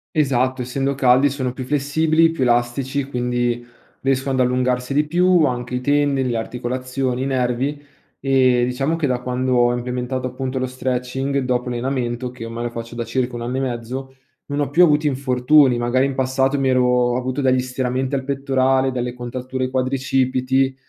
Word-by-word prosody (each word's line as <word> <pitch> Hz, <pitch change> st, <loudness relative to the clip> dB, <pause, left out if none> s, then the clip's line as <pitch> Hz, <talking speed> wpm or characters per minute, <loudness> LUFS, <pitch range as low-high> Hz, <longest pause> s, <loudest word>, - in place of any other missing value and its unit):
Esatto, 130 Hz, -3 st, +1 dB
essendo 135 Hz, +2 st, -2 dB
caldi 130 Hz, +1 st, +4 dB
sono 130 Hz, -2 st, -3 dB
più 130 Hz, -, -6 dB
flessibili, 155 Hz, +4 st, +2 dB
più 165 Hz, -, -5 dB
elastici, 125 Hz, +3 st, +1 dB
quindi 120 Hz, -2 st, -1 dB, 0.4 s
riescono 135 Hz, 0 st, 0 dB
ad 130 Hz, -, 0 dB
allungarsi 125 Hz, 0 st, 0 dB
di 150 Hz, +1 st, +3 dB
più, 175 Hz, +1 st, +3 dB
anche 125 Hz, -1 st, -2 dB
i 125 Hz, -, -2 dB
tendini, 140 Hz, -2 st, +1 dB
le 115 Hz, -, -1 dB
articolazioni, 125 Hz, +2 st, -3 dB
i -, -, -1 dB
nervi. 130 Hz, +2 st, -1 dB, 0.4 s
Ehm, 130 Hz, -3 st, +3 dB
diciamo 135 Hz, +6 st, -1 dB
che, 165 Hz, -3 st, -1 dB
da 125 Hz, -2 st, 0 dB
quando 125 Hz, +1 st, -1 dB
ho 120 Hz, 0 st, +4 dB
implementato 125 Hz, +1 st, -3 dB
appunto 130 Hz, +1 st, -4 dB
lo 130 Hz, -, 0 dB
stretching 130 Hz, +2 st, -2 dB
dopo 125 Hz, -1 st, -1 dB
l'allenamento, 125 Hz, 0 st, -2 dB
che 125 Hz, -2 st, -9 dB
ormai 115 Hz, +1 st, -5 dB
lo 120 Hz, -, -2 dB
faccio 115 Hz, 0 st, -7 dB
da 120 Hz, -1 st, -3 dB
circa 125 Hz, +1 st, -2 dB
1 120 Hz, -, -5 dB
anno 125 Hz, +2 st, -3 dB
e -, -, 0 dB
mezzo, 130 Hz, +1 st, -4 dB, 0.3 s
non 145 Hz, 0 st, -2 dB
ho 140 Hz, -1 st, -2 dB
più 170 Hz, +4 st, +4 dB
avuto 150 Hz, -2 st, +3 dB
infortuni. 130 Hz, -1 st, +3 dB
Magari 125 Hz, +3 st, +1 dB
in 135 Hz, -, -4 dB
passato 130 Hz, +1 st, +1 dB
mi 135 Hz, -, +1 dB
ero 130 Hz, -1 st, +3 dB
ho 125 Hz, -1 st, +2 dB
avuto 130 Hz, +2 st, -2 dB
degli 130 Hz, -1 st, +3 dB
stiramenti 130 Hz, +1 st, -2 dB
al 135 Hz, -, -2 dB
pettorale, 135 Hz, -1 st, +1 dB
delle 125 Hz, -1 st, -3 dB
contratture 130 Hz, +1 st, -4 dB
quadricipiti, 130 Hz, 0 st, 0 dB
130 Hz, 180 wpm, -20 LUFS, 125-135 Hz, 0.4 s, caldi